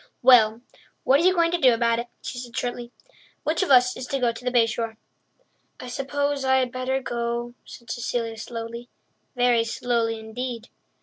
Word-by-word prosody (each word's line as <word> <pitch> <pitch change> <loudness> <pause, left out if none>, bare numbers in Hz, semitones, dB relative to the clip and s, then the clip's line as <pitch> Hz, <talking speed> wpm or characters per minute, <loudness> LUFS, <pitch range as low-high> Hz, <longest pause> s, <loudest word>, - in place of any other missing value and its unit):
"Well, 230 -3 +6 0.4
what 270 +2 +4
are - - +1
you 370 +1 +4
going 335 -1 +3
to 350 - 0
do 255 -5 +5
about 230 0 +1
it?" 235 - -5 0.2
she 245 - -5
said 245 -2 -8
shortly. 245 -1 -3 0.5
"Which 325 +3 0
of 380 - 0
us 250 -2 +5
is 255 - -7
to 275 - -1
go 245 -3 +1
to 230 - -11
the 250 - 0
Bay 240 -2 +4
Shore?" 225 -1 -4 0.8
"I 250 - -8
suppose 285 +2 -2
I 265 0 +3
had 255 -2 0
better 255 +1 -1
go," 240 -1 -3
said 235 -1 -10
Cecilia 235 -1 -3
slowly—very 235 +1 -3
slowly 230 -1 -1
indeed. 230 +1 -6
245 Hz, 180 wpm, -24 LUFS, 235-260 Hz, 0.8 s, Well